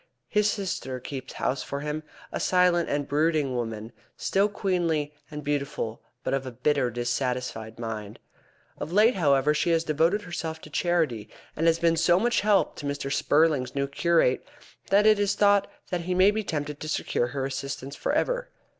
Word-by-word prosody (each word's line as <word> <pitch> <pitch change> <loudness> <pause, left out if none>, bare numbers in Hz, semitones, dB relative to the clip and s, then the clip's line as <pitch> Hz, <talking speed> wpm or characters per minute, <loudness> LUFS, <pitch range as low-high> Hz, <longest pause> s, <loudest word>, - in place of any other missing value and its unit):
His 210 0 +3
sister 180 - -3
keeps 130 0 -7
house 130 - -1
for 140 0 -5
him, 150 +1 -3 0.3
a - - -3
silent 180 -2 +3
and 145 -1 -1
brooding 150 -2 +1
woman, 115 -2 -4 0.3
still 200 +2 +2
queenly 170 -7 -1 0.2
and 150 -1 -7
beautiful, 140 -5 -2 0.2
but - - -1
of 135 -1 0
a - - -5
bitter, 130 +1 +1
dissatisfied 120 -2 -3
mind. 110 -3 -5 0.6
Of 155 - -5
late, 215 +6 +5
however, 145 -4 +3
she 155 +3 0
has 165 -1 +3
devoted 165 +7 +1
herself 165 -3 -4
to 150 - -12
charity, 155 - 0 0.3
and 165 +2 +1
has 165 0 +4
been 165 0 +3
of 165 - 0
so 175 +2 +4
much 240 +3 +2
help 205 -1 +2
to 145 - -5
Mr. 140 -1 -2
Spurling's 145 -5 +2
new 140 0 0
curate 150 -2 +2 0.5
that 200 +2 +4
it 215 -1 +6
is 205 0 +1
thought 205 -1 +4 0.2
that 180 -1 -1
he 180 +2 -2
may 190 +3 +6
be 215 +1 -2
tempted 150 -4 -3
to 155 - -5
secure 120 -4 0
her 135 +1 -3
assistance 135 0 -5
for - - -2
ever. - - 0
150 Hz, 180 wpm, -26 LUFS, 135-180 Hz, 0.6 s, it